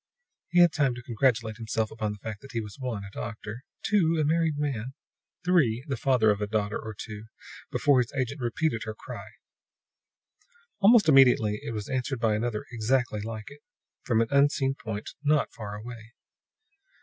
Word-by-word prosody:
He 175 - +5
had 175 -2 +7
time 140 -7 +1
to 120 - -9
congratulate 115 -2 +1
himself 110 -1 -2
upon 110 -1 -2
the 105 - -7
fact 105 +1 -7
that 135 - -12
he 115 - 0
was 105 +3 -8
(1) 120 -6 -3
a 100 - -9
doctor, 115 +2 -6 0.2
(2) 165 -6 +3
a 155 - +2
married 160 -1 +1
man, 135 -3 -3 0.5
(3) 135 -10 +3
the 140 - -1
father 120 -3 +3
of 105 0 -2
a 105 - 0
daughter 105 0 -1
or 110 -1 -7
two, 105 +1 -8 0.5
before 140 -3 +3
his 125 0 0
agent 135 +2 -2
repeated 120 0 0
her 110 -1 -5
cry. - - -8 1.5
Almost 210 -1 +6
immediately 125 -7 +5
it 115 - -4
was 105 -1 -4
answered 130 -1 -2
by 115 -2 +2
another 110 0 -2
exactly 120 -1 0
like 110 +2 -6
it, 145 +1 -14 0.4
from 115 -3 +2
an 115 - +1
unseen 140 -1 +3
point 110 -4 -6
not 150 0 +2
far 105 -2 -6
away. 115 +1 -9
120 Hz, 175 wpm, -27 LUFS, 110-140 Hz, 1.5 s, had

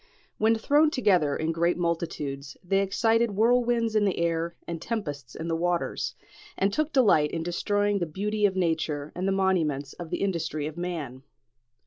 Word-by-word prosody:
When 220 +1 +4
thrown 290 +7 +3
together 185 - +2
in 160 +1 -1
great 170 +1 +1
multitudes, 150 -5 -3
they 195 +2 +1
excited 225 +4 +2
whirlwinds 235 0 +2
in 215 - +4
the 195 -2 +1
air 170 0 -1
and 170 -1 -5
tempests 145 - -4
in 160 - -5
the 165 - 0
waters, 175 +1 -1 0.4
and 195 +1 +1
took 310 +4 0
delight 205 - +4
in 165 +1 -3
destroying 205 +4 0
the 175 - -1
beauty 205 +6 0
of 190 - -4
nature 160 -4 -1
and 185 +2 -2
the - - +2
monuments 165 -8 0
of 175 -2 -8
the - - -2
industry 160 -6 -2
of 155 0 -5
man. 165 -8 -5
175 Hz, 170 wpm, -27 LUFS, 160-205 Hz, 0.4 s, When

